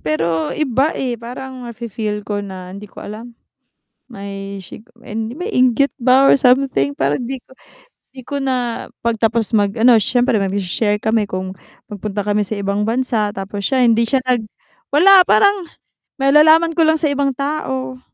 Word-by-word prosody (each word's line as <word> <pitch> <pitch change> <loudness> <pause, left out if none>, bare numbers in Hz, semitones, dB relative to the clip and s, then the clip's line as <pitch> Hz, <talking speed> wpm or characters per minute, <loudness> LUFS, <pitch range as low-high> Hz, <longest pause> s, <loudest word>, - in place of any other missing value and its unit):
pero 160 0 -1
iba, 275 0 0
eh. 245 -3 -3
Parang 255 +1 -8
nafi-feel 215 -2 -5
ko 205 0 -3
na 185 -2 -8
hindi 200 +2 -10
ko - - -11
alam, 230 +3 -9 0.7
may 200 -3 -8
sigu 190 +4 -13 0.2
may 235 - -5
inggit 255 - +2
ba 260 +1 +4
or - - +6
something 250 - +2
parang 140 - -1
'di 260 +1 -5
ko - - -28 0.6
'di 265 - -10
ko 285 - -3
na 255 -4 -2 0.2
'pag 235 -1 -1
tapos 225 0 0
mag 205 -1 +2
ano, 240 0 +6
siyempre 245 +3 +2
magse-share 200 +1 -1
kami 220 -1 +1
kung 185 -1 -5 0.3
nagpunta 205 0 -5
kami 210 0 +1
sa 205 +1 -5
ibang 200 +1 -1
bansa 225 -3 -1
tapos 200 +1 -6
siya 260 +3 +1
hindi 230 -1 +4
siya 260 +3 +1
nag 250 -3 0 0.5
wala, 365 +5 +7
parang 400 -1 +3 0.5
malalaman 310 +4 +5
ko 330 - +3
lang 315 - +4
sa 310 -2 0
ibang 275 -1 0
tao. 265 -2 -3
235 Hz, 160 wpm, -18 LUFS, 205-265 Hz, 0.7 s, wala